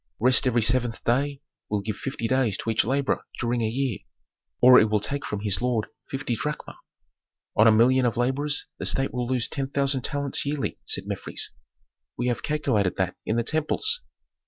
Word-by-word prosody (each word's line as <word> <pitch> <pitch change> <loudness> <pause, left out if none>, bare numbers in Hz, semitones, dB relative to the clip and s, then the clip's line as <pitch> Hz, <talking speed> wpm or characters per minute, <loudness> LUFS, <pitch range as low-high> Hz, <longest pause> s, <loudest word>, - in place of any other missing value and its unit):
"Rest 130 +3 +5
every 120 -2 +2
seventh 120 0 0
day 140 +4 0 0.3
will 105 -1 0
give 105 0 -4
fifty 125 -1 -4
days 125 -6 +1
to 115 - -2
each 110 - +2
laborer 135 +5 0 0.2
during 120 0 0
a 110 - +1
year, 130 -2 -2 0.6
or 125 0 +8
it 110 - +3
will 105 0 +2
take 140 +7 -2
from 105 -1 -4
his 100 -1 +1
lord 120 -3 0 0.2
fifty 135 -2 -3
drachma. 150 +7 -5 0.8
On 110 - +6
a - - +8
million 125 +3 +4
of 120 0 -2
laborers 140 +4 0
the - - -2
state 135 0 0
will 125 -1 -2
lose 125 -2 0
ten 135 -1 -3
thousand 140 -1 +1
talents 140 +1 -1
yearly," 145 -1 -3
said - - 0
Mefres. - - -3 0.7
"We 125 +1 0
have 120 -1 -2
calculated 130 - 0
that - - -1
in 110 - +1
the 120 - +1
temples." 295 - 0
125 Hz, 185 wpm, -25 LUFS, 115-140 Hz, 0.8 s, or